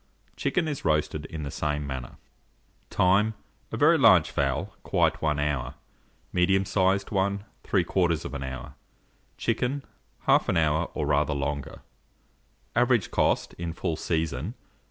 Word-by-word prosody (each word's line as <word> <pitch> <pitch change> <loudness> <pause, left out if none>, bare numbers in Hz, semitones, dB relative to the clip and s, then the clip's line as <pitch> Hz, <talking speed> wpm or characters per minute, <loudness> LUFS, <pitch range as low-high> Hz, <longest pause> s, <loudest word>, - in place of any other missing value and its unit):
Chicken 175 -3 0
is 145 -3 -4
roasted 75 0 0
in 80 -2 -6
the 70 - -4
same 75 0 -2
manner. 65 -3 -6 0.7
Time. 100 +4 +3 0.4
A - - -3
very - - +5
large - - +6
fowl, 70 -2 -1
quite - - +1
1 75 -2 +1
hour, 70 -2 -1 0.6
medium 95 +2 +3
sized 95 0 +1
one 100 0 0 0.2
3/4 85 -6 0
hour, 65 -1 -6 0.6
chicken 135 +3 -1 0.4
1/2 - - +4
hour, 80 -1 +2
or - - -1
rather 70 0 +2
longer. 70 0 -4 0.9
Average 120 -3 +3
cost, - - +1
in 85 -1 -3
full 80 -1 -2
season, 80 - -2
5s. - - -36
80 Hz, 130 wpm, -27 LUFS, 75-95 Hz, 0.9 s, large